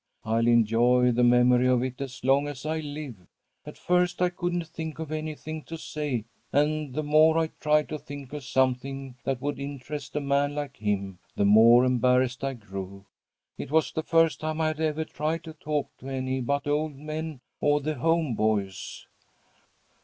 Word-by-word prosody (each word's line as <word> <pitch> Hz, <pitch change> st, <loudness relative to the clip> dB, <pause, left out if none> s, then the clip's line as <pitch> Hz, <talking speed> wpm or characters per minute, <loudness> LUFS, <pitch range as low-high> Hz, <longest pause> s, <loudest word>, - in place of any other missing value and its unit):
I'll 115 Hz, +1 st, +1 dB
enjoy 120 Hz, +2 st, +4 dB
the 120 Hz, +1 st, +2 dB
memory 125 Hz, +1 st, +5 dB
of 125 Hz, -1 st, +3 dB
it 130 Hz, +1 st, -4 dB
as 130 Hz, -2 st, -7 dB
long 135 Hz, +2 st, +3 dB
as 145 Hz, -1 st, -7 dB
I 160 Hz, +1 st, -1 dB
live. 145 Hz, -5 st, -6 dB, 0.5 s
At -, -, -9 dB
first 180 Hz, 0 st, +1 dB
I 180 Hz, 0 st, +3 dB
couldn't 175 Hz, -1 st, -2 dB
think 160 Hz, -1 st, -6 dB
of 160 Hz, -1 st, -6 dB
anything 155 Hz, 0 st, -5 dB
to 165 Hz, -, -7 dB
say, 145 Hz, -8 st, -3 dB, 0.3 s
and 150 Hz, -1 st, 0 dB
the 155 Hz, -, -1 dB
more 155 Hz, +2 st, +5 dB
I 165 Hz, -1 st, +1 dB
tried 150 Hz, 0 st, +2 dB
to 155 Hz, -, -4 dB
think 145 Hz, -2 st, -9 dB
of 150 Hz, -2 st, -5 dB
something 130 Hz, +1 st, -1 dB
that 135 Hz, -2 st, -1 dB
would 145 Hz, +2 st, -3 dB
interest 140 Hz, 0 st, -6 dB
a -, -, +2 dB
man 140 Hz, 0 st, +1 dB
like 145 Hz, -2 st, -5 dB
him, 100 Hz, -3 st, -2 dB, 0.2 s
the 100 Hz, -, +2 dB
more 115 Hz, +4 st, +7 dB
embarrassed 125 Hz, 0 st, +2 dB
I 135 Hz, -1 st, -1 dB
grew. 100 Hz, -3 st, -8 dB, 0.5 s
It -, -, -5 dB
was 155 Hz, +1 st, +2 dB
the 160 Hz, -, -2 dB
first 165 Hz, 0 st, +3 dB
time 155 Hz, 0 st, -3 dB
I 160 Hz, -1 st, +2 dB
had 155 Hz, -1 st, -5 dB
ever 160 Hz, 0 st, 0 dB
tried 155 Hz, +2 st, -3 dB
to 160 Hz, -, -9 dB
talk 150 Hz, -2 st, -3 dB
to 135 Hz, -, -8 dB
any 130 Hz, 0 st, -2 dB
but 140 Hz, +3 st, -1 dB
old 150 Hz, +1 st, 0 dB
men 155 Hz, 0 st, -5 dB, 0.2 s
or 145 Hz, 0 st, +3 dB
the 155 Hz, +2 st, -2 dB
home 160 Hz, 0 st, +1 dB
boys. 105 Hz, -3 st, -2 dB
140 Hz, 185 wpm, -27 LUFS, 125-155 Hz, 0.5 s, more